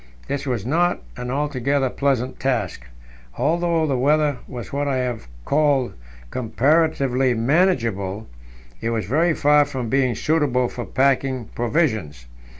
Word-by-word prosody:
This 140 0 -3
was 120 -6 -2
not 175 +7 +1
an 125 - -5
altogether 140 -1 0
pleasant 130 -2 -1
task; 115 - -1 0.5
although 170 +1 +1
the 135 -4 0
weather 145 0 +2
was 125 -2 -8
what 145 +1 -1
I 135 -2 0
have 125 - -3 0.2
called 145 -4 +2 0.4
"comparatively 135 0 +1
manageable," 115 - +1 0.5
it 115 - -1
was 115 -4 -1
very 155 - +2
far 150 0 +5
from 130 -4 -4
being 130 -2 +2
suitable 140 -5 +1
for 120 - -6
packing 130 +1 0
provisions. 110 - -1
135 Hz, 130 wpm, -22 LUFS, 120-150 Hz, 0.5 s, far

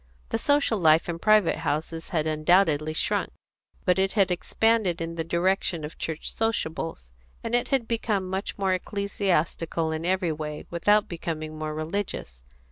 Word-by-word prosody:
The - - -1
social 285 -7 +2
life 160 -1 +5
in 170 -1 -3
private 215 -2 +4
houses 160 +1 -3
had 155 -3 0
undoubtedly 155 -1 +2
shrunk; - - 0 0.5
but 180 +1 +3
it 195 0 +1
had 195 -3 +3
expanded 205 0 +1
in 165 0 -3
the 165 -1 -2
direction 170 0 0
of 150 - -7
church 160 -1 -4
sociables, 165 - -2 0.3
and 230 - -4
it 245 0 +2
had 260 -4 0
become 215 -5 -1
much 190 +2 -3
more 195 -2 +1
ecclesiastical 180 -4 -1
in 160 +1 -3
every 180 -1 +1
way, 150 -1 -5
without 205 +5 +3
becoming 155 -2 -5
more 155 0 -4
religious. 155 - -4
170 Hz, 155 wpm, -26 LUFS, 155-200 Hz, 0.5 s, life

